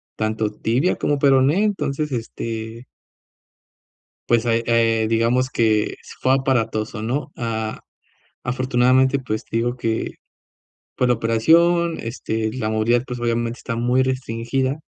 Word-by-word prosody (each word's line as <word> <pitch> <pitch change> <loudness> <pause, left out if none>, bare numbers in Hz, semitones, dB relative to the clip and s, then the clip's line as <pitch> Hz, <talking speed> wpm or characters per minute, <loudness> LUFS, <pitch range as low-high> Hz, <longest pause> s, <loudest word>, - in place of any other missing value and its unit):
tanto 110 0 -1
tibia 125 +12 +1
como 145 -1 0
peroné. 140 +6 +4
Entonces 150 -7 -2
este 115 0 -5 1.4
pues 120 0 +3
ahí, 115 -1 +2
eh, 115 -1 +2
digamos 115 +3 +2
que 110 -4 +1 0.3
fue 130 - +2
aparatoso, 115 -4 -1
¿no? 135 +7 -2
Ah, 110 -2 -3 0.7
afortunadamente, 130 +1 +2
pues 110 -5 -4
te - - -5
digo 120 +2 0
que, 115 -2 -2 0.8
por 125 - +1
la 125 - +4
operación 165 +10 +3
este, 110 -1 -3
la 120 -4 -2
movilidad, 110 +2 +2
pues 125 -1 -5
obviamente 120 0 -1
está 115 - -5
muy 125 +2 +2
restringida. 130 +2 -2
120 Hz, 125 wpm, -21 LUFS, 115-130 Hz, 1.4 s, peroné